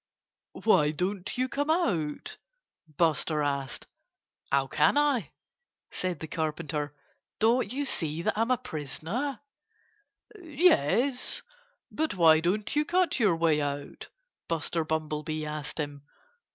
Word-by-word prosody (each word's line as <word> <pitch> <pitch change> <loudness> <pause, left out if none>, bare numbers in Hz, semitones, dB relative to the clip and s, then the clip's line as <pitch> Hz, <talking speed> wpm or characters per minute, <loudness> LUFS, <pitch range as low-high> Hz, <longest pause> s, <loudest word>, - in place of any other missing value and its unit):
"Why 150 -9 +5
don't 180 +7 -3
you 255 +1 +1
come 285 +3 -2
out?" 180 - 0 0.6
Buster 155 -2 +2
asked. 140 -2 -2 0.7
"How 135 0 +3
can 135 - +3
I?" 290 -5 +2 0.6
said 180 -4 -3
the 160 - -6
Carpenter. 150 -2 -3 0.4
"Don't 230 0 +2
you 285 +3 -1
see 160 - -1
that - - 0
I'm 225 +3 +1
a 255 - +3
prisoner?" 225 - -4 1.0
"Yes! 280 - +2 0.5
But 315 -5 -1
why 160 -3 +6
don't 200 - -1
you 300 - +3
cut 355 -1 +1
your 205 -7 +4
way 165 -2 +2
out?" 145 0 -5 0.4
Buster 165 0 -1
Bumblebee 155 0 -2
asked 150 0 -5
him. 145 -2 -4
165 Hz, 120 wpm, -28 LUFS, 150-250 Hz, 1.0 s, why